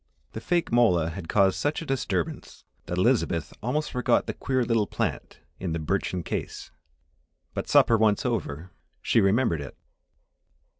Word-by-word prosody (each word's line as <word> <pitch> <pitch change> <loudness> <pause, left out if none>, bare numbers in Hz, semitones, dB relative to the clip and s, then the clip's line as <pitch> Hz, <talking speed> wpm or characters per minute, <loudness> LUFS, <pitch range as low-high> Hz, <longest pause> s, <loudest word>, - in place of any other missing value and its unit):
The - - -7
fake 175 -5 0
mola 90 -9 +3
had 85 -1 -8
caused 95 -2 +3
such 145 +1 0
a 165 - -6
disturbance 100 - -3 0.2
that 90 - -3
Elizabeth 95 -6 +1
almost 150 +7 -1
forgot 125 - +1
the - - -3
queer 130 -2 -1
little 115 -3 +1
plant - - -4 0.2
in 90 -4 -3
the 85 - -2
birchen 90 +2 -2
case. - - -5 0.8
But - - -4
supper 115 -1 +5
once 110 +1 +2
over, 90 - -3 0.3
she - - +3
remembered 95 - +2
it. 70 - -9
105 Hz, 150 wpm, -26 LUFS, 85-125 Hz, 0.8 s, supper